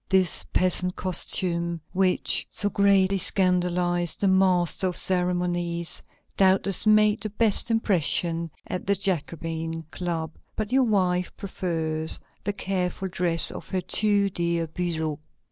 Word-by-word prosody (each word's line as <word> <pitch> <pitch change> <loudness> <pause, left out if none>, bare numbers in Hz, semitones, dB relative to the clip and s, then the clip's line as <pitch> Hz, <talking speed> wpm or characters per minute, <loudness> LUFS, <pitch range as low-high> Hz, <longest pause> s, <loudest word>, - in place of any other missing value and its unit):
This 190 -3 +4
peasant 180 0 +2
costume, 170 -2 0
which 185 -1 +1
so 205 0 -1
greatly 195 -1 +3
scandalized 180 -2 +1
the 200 - +3
master 190 -1 +3
of 180 - -3
ceremonies, 175 -2 -1 0.3
doubtless 195 +1 +3
made 215 0 +4
the 215 - -3
best 215 +2 0
impression 170 -6 +1 0.2
at 180 - -5
the 200 - +3
Jacobin 165 -3 -3
Club, 165 -3 -3 0.2
but 215 0 -3
your 260 0 +4
wife 180 -4 +1
prefers 160 -5 -3 0.2
the 205 - -2
careful 190 -1 -2
dress 170 -2 0
of - - -9
her 185 -1 -1
too 205 0 +1
dear 170 -1 0
Buzot. 160 -2 -3
180 Hz, 125 wpm, -25 LUFS, 170-195 Hz, 0.3 s, This